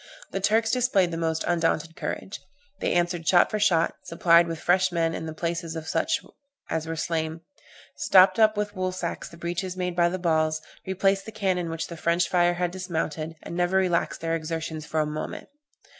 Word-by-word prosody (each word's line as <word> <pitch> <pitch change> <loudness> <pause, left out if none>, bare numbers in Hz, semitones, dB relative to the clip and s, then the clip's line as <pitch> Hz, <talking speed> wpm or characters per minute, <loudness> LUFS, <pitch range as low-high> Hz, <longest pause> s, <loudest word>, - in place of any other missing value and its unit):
The - - -2
Turks 220 +3 +2
displayed 230 -8 +2
the - - -3
most 160 -1 -1
undaunted 165 -1 0
courage; 195 - -5 0.4
they - - 0
answered 175 -1 0
shot 175 - +5
for 215 - -1
shot, 175 -6 +3
supplied 170 -1 +4
with 165 -1 -4
fresh 185 +1 +2
men 165 -1 -1
the - - -4
places 165 0 -3
of 160 -1 -6
such 315 - 0 0.5
as 160 0 -1
were 165 - -3
slain, 160 0 -2 0.5
stopped 190 +3 +5
up 215 -1 +5
with 205 0 -2
woolsacks 185 -2 -3
the 170 - -13
breaches 175 +2 -3
made 180 -1 -2
by 175 -1 +3
the 185 - -3
balls, 155 -3 +1 0.3
replaced 195 +1 +1
the - - -6
cannon 185 -5 -1
which 165 0 -3
the 170 - -8
French 170 +2 +1
fire 175 -1 +3
had 175 0 -1
dismounted, 165 -3 -3
and - - -7
never 175 +2 +2
relaxed 180 -3 +1
their 165 0 0
exertions 160 -1 -4
for 155 - 0
a - - +1
moment. 150 +1 -5
170 Hz, 190 wpm, -26 LUFS, 165-185 Hz, 0.5 s, shot